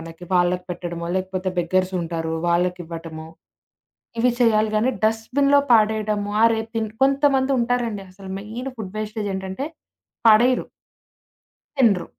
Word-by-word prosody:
మనకి. 165 +1 -10
వాళ్ళకి 180 0 +2
పెట్టడమో, 170 -1 -5
లేకపోతే 185 0 -2
బెగ్గర్స్ 185 +2 0
ఉంటారు. 165 -1 -3 0.2
వాళ్ళకివ్వటమో 170 -2 -2 0.9
ఇవి 245 +1 +3
చేయాలి 215 -2 +3
గానీ, 230 +5 +2
డస్ట్‌బిన్‌లో 275 +6 +2
పడేయడము. 215 -2 +2
ఆ - - +6
రేపు 225 0 -3
తిన్ 220 -1 -1
కొంతమంది 275 -1 +3
ఉంటారండి 235 -4 -1
అసలు 190 0 -11
మెయిన్ 225 +6 -6
ఫుడ్ 200 -4 -7
వేస్టేజ్ 215 -1 -3
ఏంటంటే 190 +8 -4 0.6
పడెయ్యరు! 240 +4 +4 1.1
తినరు, 220 -9 +3
210 Hz, 120 wpm, -22 LUFS, 180-230 Hz, 1.1 s, ఆ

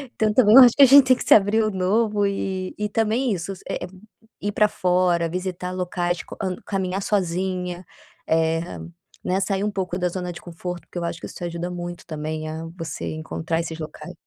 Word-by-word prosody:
Então 215 -1 +1
também 220 -2 +6
eu 270 - +12
acho 240 -2 +6
que 285 - +7
a - - +11
gente 275 +1 +8
tem 255 - +6
que - - -5
se - - +6
abrir 215 +2 +4
o 215 - 0
novo 205 +2 +1
e 190 -1 -3
e 210 - -1
também 225 +4 +1
isso, 185 +1 -4 0.2
eh, 175 - -3 0.5
ir 205 - -1
pra 210 +1 +3
fora 180 -3 +1
visitar 180 +1 -4
locais, 175 -1 -2
quand 185 -1 -4
ca - - -17
caminhar 190 -1 -2
sozinha, 180 -2 -1 0.4
eh, 160 0 +2 0.6
né, 185 +1 0
sair 195 +1 0
pouco 185 -3 -3
da 180 0 +1
zona 180 0 -4
de - - -10
conforto 175 0 -6
porque - - -11
eu - - -4
acho 170 -1 -3
que - - -8
isso - - -9
ajuda 170 0 -4
muito 175 0 -6
também 155 0 -4
a 160 +1 -5
você 165 -3 -5
encontrar 160 +1 -3
esses 165 -1 -5
locais. 160 +3 -8
180 Hz, 200 wpm, -23 LUFS, 170-205 Hz, 0.6 s, eu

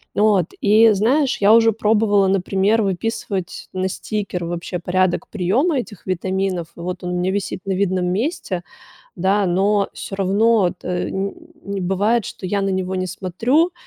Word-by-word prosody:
От, 205 -5 +3
и 215 +2 +6
знаешь, 255 +8 +2
я 205 +1 +5
уже 225 -1 +5
пробовала, 210 -2 +2
например, 195 +3 +2
выписывать 195 -1 -3
на 185 0 -1
стикер, 195 -3 -4
вообще, 175 +1 -4
порядок 180 +1 0
приема 230 - +1
этих 215 -5 -8
витаминов, 185 -1 -2
вот, 180 +2 -5
он 180 - -3
у 180 - -1
меня 180 +1 0
висит 195 -1 -3
на 195 - -1
видном 185 -1 0
месте, 195 - -2 0.5
да, 195 +3 +1
но 195 +3 +2
всё 195 - -7
равно, 205 +2 +3
от, 175 0 -4
э, 180 0 -2
нь 200 - -5
бывает, 200 +5 +1
что - - -7
я 200 +2 0
на 195 - 0
него 190 0 -2
не 185 0 -2
смотрю, 225 - +1
195 Hz, 160 wpm, -20 LUFS, 185-215 Hz, 0.5 s, и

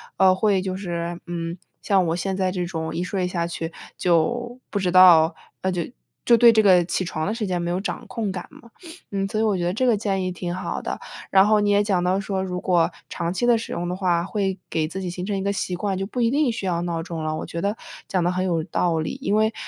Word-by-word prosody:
呃， 190 -1 +5
会 195 0 +2
就 185 0 -3
是， 175 -2 -4
嗯， 170 0 -4 0.2
像 195 -3 +2
我 165 - 0
现 190 +2 -2
在 190 -1 +1
这 180 -2 -2
种 160 -2 -4
一 175 - -1
睡 180 0 -1
下 175 -1 -1
去 165 -1 -5 0.2
就 240 +9 +1
不 - - -3
知 185 -2 0
道， 170 -3 +7 0.3
呃， 190 - 0
就 180 -1 -1 0.4
就 235 - +6
对 235 0 +8
这 220 -1 +4
个 185 -3 +6
起 185 - -1
床 155 -1 -3
的 210 - 0
时 225 -2 -2
间 180 -2 -1
没 170 - -2
有 180 - 0
掌 210 - -4
控 220 -5 -3
感 180 -2 -6
嘛。 235 - -16 0.4
嗯， 195 -1 -1
所 215 +2 -2
以 - - +2
我 215 -3 +2
觉 175 - -2
得 175 - +1
这 255 +6 0
个 240 -3 +4
建 195 -2 -1
议 185 - -1
挺 175 -1 -4
好 185 - -4
的。 - - -4 0.3
然 190 0 +6
后 215 0 +4
你 205 0 +1
也 205 0 +4
讲 190 -4 +1
到 185 +2 +2
说， 195 -1 -2
如 180 -1 -3
果 175 -3 +3 0.2
长 170 -1 -2
期 240 - -1
地 240 -1 +5
使 225 - -6
用 175 - -3
的 180 - -2
话， 180 -3 +1
会 195 -1 -1
给 155 -1 0
自 190 +4 -6
己 185 - -3
形 180 +1 -5
成 200 0 -1
一 190 - -3
个 200 0 0
习 185 -2 -2
惯， 195 +2 -2
就 195 - -2
不 250 - -5
一 230 0 +3
定 285 -2 +2
需 225 -3 -5
要 170 -2 0
闹 170 -2 -2
钟 165 -2 -5
了， 155 0 -1
我 - - -4
觉 170 - -5
得 205 +3 -1 0.3
讲 185 -2 0
得 175 - +2
很 185 0 -1
有 170 -3 0
道 170 +1 0
理。 155 +11 -3
因 205 - +1
为， 220 +1 +2
185 Hz, 290 characters per minute, -23 LUFS, 175-205 Hz, 0.4 s, 对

